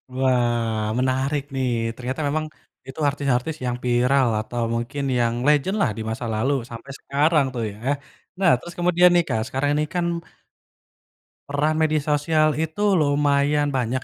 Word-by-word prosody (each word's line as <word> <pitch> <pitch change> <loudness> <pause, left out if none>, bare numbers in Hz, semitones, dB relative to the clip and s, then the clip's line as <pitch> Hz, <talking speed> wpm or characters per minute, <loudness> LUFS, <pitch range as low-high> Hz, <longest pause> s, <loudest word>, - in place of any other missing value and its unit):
Wah. 120 -4 +1 0.2
Menarik 130 +3 0
nih 130 -1 0 0.3
ternyata 130 +5 -4
memang 155 +2 -1 0.4
itu 135 +3 -9
artis-artis 140 +1 -1
yang 125 -1 -1
viral 125 +2 +3
atau 120 +2 -4
mungkin 120 +5 -3 0.2
yang 115 -1 +1
legend-lah 150 - +2
di - - -4
masa 115 +2 -4
lalu 130 +6 +1 0.2
sampai 115 +4 -9
sekarang 150 +1 +2
tuh 120 -2 -3
ya. 100 - -13 0.6
Nah 185 -3 +5
terus 175 +6 -10
kemudian 175 0 +4
nih 175 - +4
Kak, 110 - 0
sekarang 135 +2 -1
ini 150 - +1
kan 175 -1 +1 1.4
peran 150 +2 0
media 155 -2 +1
sosial 155 +1 +2
itu 160 +4 -3 0.2
lumayan 145 0 +2
banyak 130 -1 -1
140 Hz, 145 wpm, -23 LUFS, 125-155 Hz, 1.4 s, Nah